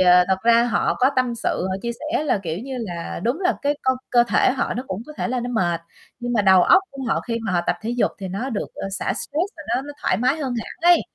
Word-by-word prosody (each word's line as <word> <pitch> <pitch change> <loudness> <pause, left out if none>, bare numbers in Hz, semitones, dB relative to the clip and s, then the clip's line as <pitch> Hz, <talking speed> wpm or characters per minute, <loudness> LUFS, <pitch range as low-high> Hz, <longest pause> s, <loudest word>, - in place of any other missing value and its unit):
ờ, 180 -1 +7
thật 190 - +3
ra 235 0 +5
họ 240 - +1
có 260 +2 +4
tâm 255 -2 +1
sự, 185 - -1
họ 190 - -1
chia 235 - -2
sẻ 305 +7 -2
là, 275 - +1
kiểu 165 -1 -3
như 265 +6 -7
là, 175 -7 -5
đúng 250 +10 0
là 365 0 +2
cái 285 +1 +2
co 260 0 +2
cơ 240 -1 +5
thể - - +4
họ 260 - -1
nó 250 - -3
cũng 190 0 -4
có 305 - -9
thể - - -2
là 250 0 -1
nó 245 - -4
mệt, 175 -8 0 0.4
nhưng 245 0 -2
mà 215 -4 +2
đầu 190 -2 +6
óc 380 - +6
của 275 -1 -8
họ - - +1
khi 230 -1 -3
mà 195 - -1
họ 175 - +2
tập - - +1
thể 225 - -2
dục 245 0 +1
thì 190 -2 -5
nó 225 +9 -3
được, 220 - -3
ơ, - - -5
xả 195 - -1
stress - - -5 0.2
và - - -8
nó 240 +3 0
nó 290 +1 -8
thoải - - +2
mái 255 +7 +2
hơn 270 -5 -3
hẳn 225 - -7 0.2
ấy. - - +4
235 Hz, 290 wpm, -22 LUFS, 190-260 Hz, 0.4 s, ờ